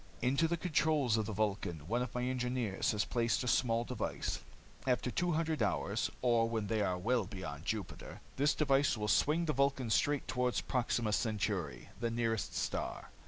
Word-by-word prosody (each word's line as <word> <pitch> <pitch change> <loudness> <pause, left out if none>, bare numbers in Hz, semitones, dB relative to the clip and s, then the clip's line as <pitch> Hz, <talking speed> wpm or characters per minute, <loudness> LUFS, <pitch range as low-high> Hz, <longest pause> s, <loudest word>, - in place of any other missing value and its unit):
"Into 140 +6 +2
the 170 +1 0
controls 155 -7 +2
of 110 -2 0
the - - -3
Vulcan 95 -7 -2
one 120 +5 0
of 125 -1 -4
my 125 - 0
engineers 125 -5 0
has 105 -1 0
placed 120 +1 +1
a - - -3
small 115 -1 +2
device. 120 -2 -3 0.5
After 125 -1 +1
two 175 +4 0
hundred 160 -3 0
hours, 105 +1 0
or 115 -2 +3
when 110 -2 -1
they 110 +1 0
are 90 -3 +1
well 115 +3 +1
beyond 85 -7 -7
Jupiter, 105 -4 -4 0.2
this 145 +3 +2
device 140 -3 +3
will 105 0 -2
swing 155 +9 +3
the 155 - 0
Vulcan 135 -3 +1
straight 145 +5 +2
toward 125 -1 0
Proxima 120 -3 0
Centauri, 105 - -1
the 120 0 0
nearest 115 -2 -1
star. - - -3
120 Hz, 175 wpm, -34 LUFS, 105-135 Hz, 0.5 s, or